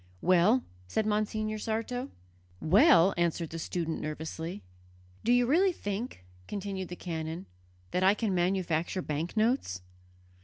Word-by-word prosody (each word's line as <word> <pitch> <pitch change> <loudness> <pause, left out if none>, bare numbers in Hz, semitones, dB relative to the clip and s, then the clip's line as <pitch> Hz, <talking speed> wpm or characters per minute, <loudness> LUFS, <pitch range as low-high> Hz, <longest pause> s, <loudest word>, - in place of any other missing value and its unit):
"Well?" 185 +8 +4 0.2
said 215 - 0
Monsignor 215 0 -1
Sarto. 230 +4 -2 0.5
"Well?" 195 - +6
answered 170 -1 0
the 165 - -5
student 165 -1 -3
nervously. 160 - -5 0.6
"Do 235 - +2
you 245 0 +5
really 355 +9 +4
think," 205 - -5 0.2
continued 195 -2 -4
the 180 - -7
canon, 165 0 -5 0.5
"that 180 - 0
I 190 +2 +5
can 210 -2 -1
manufacture 175 -1 0
banknotes?" 170 - 0
190 Hz, 120 wpm, -30 LUFS, 165-220 Hz, 0.6 s, Well